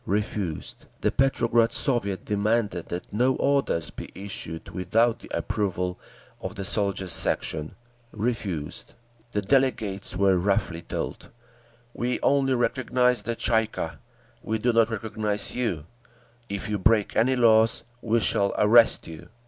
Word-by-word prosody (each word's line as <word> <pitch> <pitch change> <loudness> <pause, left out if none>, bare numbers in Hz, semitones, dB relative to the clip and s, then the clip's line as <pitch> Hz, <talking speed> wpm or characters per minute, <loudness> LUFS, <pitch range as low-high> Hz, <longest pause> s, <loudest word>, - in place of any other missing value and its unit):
Refused. 100 -4 -3
The - - +2
Petrograd 120 -3 +2
Soviet 100 -8 +1
demanded 105 -3 0
that 90 +3 -6
no 125 +4 +2
orders 140 -12 +1
be - - -8
issued 95 -4 -6
without 115 +6 +1
the - - -13
approval 90 -3 -2 0.4
of - - -5
the 100 - -4
Soldiers' 100 -2 -1
Section. 75 0 -1 0.4
Refused. 100 -9 -3 0.4
The 105 - 0
delegates 110 -5 +1
were 95 -1 +3
roughly 95 -3 0
told, - - -5 0.6
"We 125 +1 -1
only 135 -2 +3
recognise 125 -1 +1
the 115 +3 -3
Tsay 110 -1 +2
ee - - -11
kah. 80 -6 -5 0.4
We 110 - -1
do 120 +2 +1
not 115 -1 +4
recognise 105 -2 -2
you; 95 -12 -2 0.6
if 100 +2 -4
you 105 -1 -1
break 105 +2 +2
any 130 +3 +3
laws, 115 -2 +4 0.2
we 115 0 +1
shall 100 -1 +1
arrest 115 +2 +5
you." 80 -1 -10
105 Hz, 135 wpm, -26 LUFS, 95-120 Hz, 0.6 s, arrest